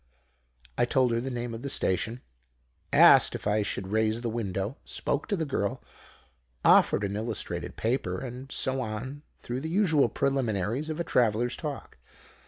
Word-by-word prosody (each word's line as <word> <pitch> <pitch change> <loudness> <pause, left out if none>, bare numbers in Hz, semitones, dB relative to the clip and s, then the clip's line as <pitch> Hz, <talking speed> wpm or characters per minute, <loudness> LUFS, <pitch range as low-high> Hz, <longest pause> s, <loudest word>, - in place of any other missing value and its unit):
"I - - +4
told 125 0 +2
her 115 0 0
the 135 - -3
name 120 -2 -4
of 115 - -6
the 140 - -4
station; 115 +1 -1 0.7
asked - - +7
if - - -7
I 105 +1 +2
should 95 -2 -3
raise 110 +2 +1
the 120 -2 -2
window; 100 +1 -3
spoke 145 - -2
to 205 - 0
the 165 -4 -2
girl; 100 -8 -2 0.8
offered 105 - +5
an 100 0 -2
illustrated 110 0 -4
paper, 110 -6 -1
and 130 +3 -7
so 130 0 0
on 125 +5 -5 0.2
through 125 +2 -5
the 160 - -4
usual 165 -6 +3
preliminaries 125 - -1
of 155 +1 -4
a - - 0
traveller's 120 -4 +1
talk. 150 -3 -7
120 Hz, 165 wpm, -28 LUFS, 110-135 Hz, 0.8 s, asked